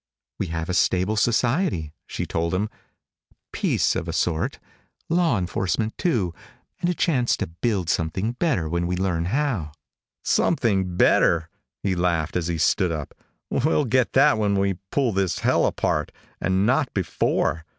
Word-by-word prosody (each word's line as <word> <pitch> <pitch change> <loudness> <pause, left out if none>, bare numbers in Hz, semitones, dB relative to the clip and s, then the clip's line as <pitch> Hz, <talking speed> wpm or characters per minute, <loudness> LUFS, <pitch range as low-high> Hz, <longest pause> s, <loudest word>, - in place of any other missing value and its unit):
"We - - -1
have 80 0 -3
a 90 - -2
stable 95 +3 +2
society," 120 - +1
she - - -4
told 85 +2 -1
him. 105 +3 -1 0.8
"Peace - - +1
of - - -3
a - - -3
sort. 80 -2 0 0.5
Law 165 -7 +2
enforcement, 95 +4 -1
too, 115 - 0 0.5
and 175 - 0
a 180 - 0
chance 130 -9 +1
to - - -2
build 90 +2 -2
something 90 +7 0
better 125 - 0
when 85 +2 -1
we 90 - -1
learn 90 -3 0
how." 110 - -1 0.5
"Something 95 -5 +1
better?" 80 0 +4 0.3
He 95 - +1
laughed 85 -3 0
as 85 -2 0
he 85 -1 -1
stood 85 +3 +2
up. 75 -3 -5 0.4
"We'll 150 +2 +2
get 125 +1 +1
that 110 - +5
when 100 -2 +1
we 95 -2 0
pull 135 -5 +1
this 95 -3 0
hell - - +2
apart, 75 -1 -1 0.3
and 95 +1 +2
not 135 +4 +2
before." 80 -3 0
95 Hz, 155 wpm, -24 LUFS, 85-120 Hz, 0.8 s, that